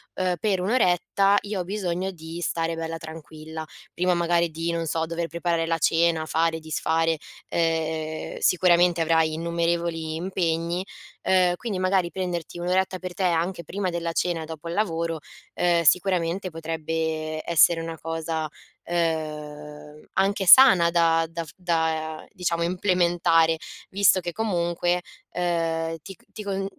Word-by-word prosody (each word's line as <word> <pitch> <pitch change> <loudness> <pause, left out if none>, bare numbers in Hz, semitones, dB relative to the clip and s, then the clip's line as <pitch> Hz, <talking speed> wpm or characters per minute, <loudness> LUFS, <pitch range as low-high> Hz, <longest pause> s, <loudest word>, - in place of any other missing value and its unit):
uhm, 185 -1 0
per 195 -2 0
un'oretta 200 -1 +2
io 205 -2 -3
ho - - -3
bisogno 190 -1 -2
di 165 0 -8
stare 165 0 -1
bella 165 0 -4
tranquilla. 160 0 -9 0.3
Prima 180 +1 +1
magari 170 0 +2
di, 165 +2 -2
non 165 -1 -2
so, 160 +1 0
dover 170 +1 -3
preparare 170 -1 -1
la 165 - +1
cena, 165 0 +2
fare, 160 +1 +1
disfare, 160 +1 0 0.3
ehm 160 -1 -1
sicuramente 175 -1 +4
avrai 160 -1 +2
innumerevoli 170 -1 -1
impegni. 170 0 -1 0.4
Ehm, 180 -1 +3
quindi 205 -4 -4
magari, 185 -2 +1
prenderti 175 -2 -4
un'oretta 185 +1 0
per 185 -1 -6
te 190 - -2
anche 170 0 0
prima 190 +3 -3
della 170 -1 -2
cena, 165 -2 -1
dopo 160 0 -8
il - - -3
lavoro, 165 -5 -1 0.4
ehm, 170 -1 +2
sicuramente 180 +2 +2
potrebbe 160 -1 -3
essere 165 0 +5
una 165 0 -6
cosa, 160 -1 -3 0.4
uhm, 150 -3 -4
anche 195 0 +1
sana 180 -6 +8
da 165 -1 +3
da 165 0 -4
f 145 - -12
da, 160 -3 -1
diciamo, 175 -4 -1
implementare, 175 -2 +2 0.3
visto 195 -1 +4
che 175 0 -4
comunque, 175 -4 0 0.3
ehm, 165 -2 -1
ti 195 - -9
c - - -28
ti 215 - -8
con 195 -1 -2
170 Hz, 140 wpm, -25 LUFS, 160-180 Hz, 0.4 s, sana